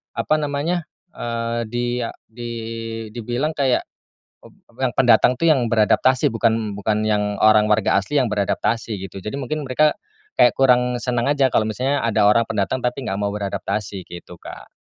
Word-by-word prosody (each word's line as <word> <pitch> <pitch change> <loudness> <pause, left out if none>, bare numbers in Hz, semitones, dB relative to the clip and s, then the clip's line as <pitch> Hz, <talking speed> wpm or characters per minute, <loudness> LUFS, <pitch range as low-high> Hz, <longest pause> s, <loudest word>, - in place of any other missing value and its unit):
apa 155 - +1
namanya, 150 +3 -2 0.2
eee, 115 -2 -3
di 120 +2 -2
a 115 - -3
di 120 +1 -8 0.6
dibilang 120 +6 -2
kayak, 135 -5 +1 0.6
ep - - -15 0.3
yang - - 0
pendatang - - +4
tuh 165 - +3
yang 140 -6 +4
beradaptasi 130 +5 +3
bukan 115 -3 0
bukan 105 +1 -1
yang 105 -1 0
orang 110 0 +5
warga 105 -2 +2
asli 120 +9 +1
yang 125 - +1
beradaptasi 105 +1 -1
gitu 95 +1 -8
jadi 105 - -4
mungkin 150 +3 -3
mereka, 150 +4 +2 0.4
kayak 120 - +5
kurang 125 -2 +3
senang 120 -1 -1
aja 140 -2 +3
kalau 115 - +1
misalnya 130 +6 -1
ada 110 -2 +3
orang 115 +2 +4
pendatang 115 +5 -2
tapi 125 +2 -1
enggak 95 - -2
mau 100 0 -1
beradaptasi 100 -1 -4
gitu 85 0 -11
Kak. - - -11
115 Hz, 165 wpm, -21 LUFS, 105-130 Hz, 0.6 s, orang